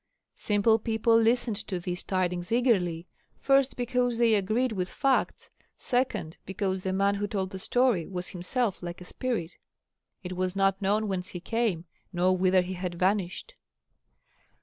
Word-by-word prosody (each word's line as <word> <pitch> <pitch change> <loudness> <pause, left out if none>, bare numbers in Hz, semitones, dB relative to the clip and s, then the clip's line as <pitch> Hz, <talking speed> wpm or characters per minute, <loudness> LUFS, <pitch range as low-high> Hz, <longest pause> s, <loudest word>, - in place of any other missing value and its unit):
Simple 215 +2 +2
people 225 +1 +2
listened 230 -1 +2
to 185 -3 -3
these 175 0 -4
tidings 180 -1 -1
eagerly, 190 -9 +2 0.3
first, 275 -1 +3
because 245 -1 0
they 230 -1 +4
agreed 215 +5 +1
with 185 -3 -2
facts, 270 -2 0 0.3
second, 245 -10 -1
because 190 0 -2
the 190 - -2
man 200 +1 +2
who 205 +1 -2
told 190 -2 -3
the 190 - -6
story 245 -5 +1
was 180 -2 -5
himself 195 +4 -2
like 175 -1 -6
a 180 - -10
spirit 215 -7 -3 0.7
it 180 0 -5
was 185 +1 -1
not 195 0 +2
known 210 +2 +1
whence 185 -2 -2
he 180 - -7
came 200 -3 -1 0.3
nor 185 0 +2
whither 185 0 +3
he 185 +1 -5
had 180 -1 -4
vanished. 190 - -1
195 Hz, 155 wpm, -28 LUFS, 180-230 Hz, 0.7 s, they